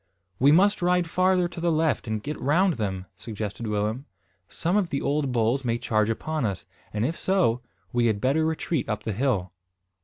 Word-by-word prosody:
"We 140 +3 +6
must 195 +6 +4
ride 180 -1 +2
farther 185 +1 +2
to 170 -1 -8
the 170 0 +2
left 155 -7 +1
and 110 -1 -2
get 150 +1 -5
round 175 +6 +3
them," 95 -6 -3
suggested 110 0 -5
Willem. 105 +5 -1 0.4
"Some 175 +4 -1
of 200 -5 +2
the 140 - -1
old 145 -2 0
bulls 120 +3 +1
may 115 -1 0
charge 110 -2 +1
upon 155 +6 -2
us, 100 -5 -2 0.3
and, 105 +2 -1
if 160 +5 -1
so, 175 -13 +1 0.3
we 120 -1 +3
had 110 -3 +1
better 140 +8 +2
retreat 160 -3 -1
up 105 - -2
the 110 - -2
hill." 105 -6 0
135 Hz, 190 wpm, -26 LUFS, 110-165 Hz, 0.4 s, We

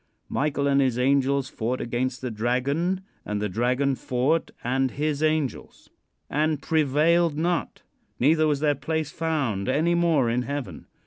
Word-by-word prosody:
Michael 140 0 0
and 140 0 +3
his 130 -3 +1
angels 135 +1 +2
fought 120 +2 -3
against 125 +2 -2
the 125 -2 -3
dragon, 135 - 0 0.2
and 105 0 -3
the 105 - -1
dragon 125 +7 +1
fought 130 +6 0
and 130 +2 +1
his 150 +2 -2
angels. 155 -5 -2 0.4
"And 155 0 0
prevailed 155 +2 +2
not; 170 +2 -1 0.4
neither 155 +4 +4
was 145 -2 0
their 150 -1 +3
place 155 +1 -3
found 140 -12 -1
any 160 +6 +2
more 165 -7 +2
in 120 +2 +1
heaven. 125 - -5
140 Hz, 145 wpm, -25 LUFS, 125-155 Hz, 0.4 s, neither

